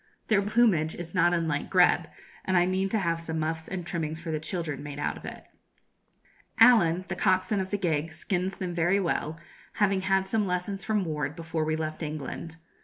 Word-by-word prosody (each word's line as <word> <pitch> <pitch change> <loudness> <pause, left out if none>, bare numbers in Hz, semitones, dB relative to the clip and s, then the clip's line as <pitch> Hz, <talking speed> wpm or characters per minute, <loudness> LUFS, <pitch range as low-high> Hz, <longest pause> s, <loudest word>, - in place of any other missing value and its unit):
Their 210 -2 +4
plumage 200 -7 +2
is 170 -1 -8
not 175 -2 +4
unlike 165 -4 -1
grebe, - - +4 0.4
and 185 -1 +1
I 175 - +5
mean 190 +1 0
to 220 - +1
have 170 -4 0
some 160 -1 -3
muffs 160 +1 -2
and 180 -3 -5
trimmings 160 -2 -3
for 165 0 -5
the 155 - -1
children 155 -3 -3
made 145 -1 -7
out 145 - -1
of - - -11
it. - - -8 1.2
Allen, 190 -7 +6
the - - -3
coxswain 190 +1 +2
of 190 0 -2
the 205 - -1
gig, 165 -4 -1
skins 180 +3 -2
them 180 -2 -3
very 175 +3 +2
well, 160 -3 -2 0.3
having 195 -3 +2
had 190 0 +2
some 210 +1 0
lessons 180 +2 -2
from 210 -3 0
Ward 150 -2 -3
before 160 -1 -3
we 155 0 0
left 155 0 -4
England. 155 +1 -5
175 Hz, 195 wpm, -28 LUFS, 160-190 Hz, 1.2 s, Allen